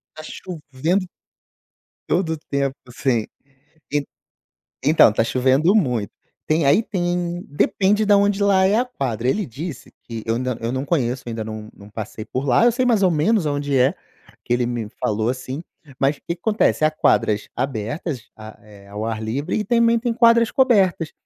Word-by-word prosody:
Tá 155 - -9
chovendo 165 +3 -3 1.0
todo 170 -1 +1
o 160 - -3
tempo 140 -1 -1 0.2
sem 120 -3 -1 0.7
Em 145 -1 +1 0.8
então 150 -6 +6
tá 110 - +1
chovendo 130 - +2
muito. 125 - +1 0.4
Tem, 155 0 +2
aí 145 +11 +5
tem 175 -3 -2
depende 200 +8 +1
da 205 - +5
onde 200 0 +2
lá 195 -2 +4
é 200 +3 +3
a 250 - +1
quadra, 125 - -3
ele 205 +7 0
disse 145 +3 -8
que 115 -2 -7
eu 115 0 0
ainda 125 -1 -2
eu 115 - -2
não 130 +2 -2
conheço, 130 -6 -1
ainda 115 -2 -4
não 110 0 -7
não 100 +1 -15
passei 110 0 -7
por 130 +4 -3
lá, 125 - +4
eu 240 - +6
sei 250 +2 0
mais 225 -5 +3
ou 180 - +4
menos 170 +5 +2
aonde 145 -1 0
é, 130 +1 +4 0.5
que 120 - 0
ele 120 0 +1
me 120 -3 -3
falou 110 +1 0
assim, 130 +3 -4 0.4
mas 140 +2 +2
o - - -25
que 170 - -4
que - - -29
acontece? 215 -7 +2
Há 155 - +3
quadras 105 -8 +1
abertas, 130 - -4
a 110 0 -11
eh, 100 -2 -16
ao 105 +2 -6
ar 110 -1 -3
livre 135 +10 -2
e 215 - -2
também 235 -1 +3
tem 240 0 -1
quadras 230 -1 +5
cobertas, 200 - +2
145 Hz, 185 wpm, -21 LUFS, 120-190 Hz, 1.0 s, então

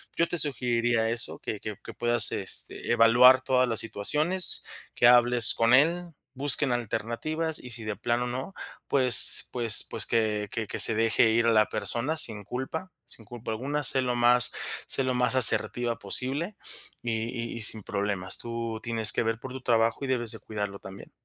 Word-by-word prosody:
yo 170 - 0
te 175 - -3
sugeriría 120 -5 0
eso, 115 0 -2
que 105 - -6
que 105 -1 -7
que - - -10
puedas, 120 -2 +5
este, 95 - 0
evaluar 120 +3 +5
todas 130 -1 0
las 115 -3 0
situaciones, 150 - +1 0.3
que 120 - +3
hables 120 -1 +5
con 115 +2 +1
él, 170 +5 +1 0.2
busquen 140 0 0
alternativas, 120 +8 -4
y 125 - -10
si 115 0 -6
de 105 -1 -5
plano 120 +1 -2
no, 130 +9 -6 0.3
pues 130 -3 +4
pues 115 -3 +3
pues, 115 - 0
que 105 -2 -2
que 110 -2 -5
que - - -7
se - - +2
deje 115 0 +2
ir 115 +1 +1
a - - +3
la 110 -1 +3
persona 130 +7 -3
sin 110 -8 +4
culpa 145 - -7
sin 115 -2 -15
culpa 115 +1 -10
alguna. 140 +7 -4
Sé 130 0 +2
lo 125 -1 -2
más 120 0 +3 0.3
sé 135 - +1
lo 130 - -2
más 125 +1 0
asertiva 120 -1 +1
posible, 140 - -2 0.5
y 120 - -4 0.4
y - - -7
y - - -7
sin 110 0 +2
problemas. 100 -2 -4
Tú 115 -1 -6
tienes 115 -2 0
que - - -1
ver 115 0 -3
por 130 - -10
tu 130 - -9
trabajo 115 +1 0
y - - -6
debes 120 -3 0
de 110 - -5
cuidarlo 105 -1 -6
también. 95 +1 -13
120 Hz, 185 wpm, -26 LUFS, 110-130 Hz, 0.5 s, puedas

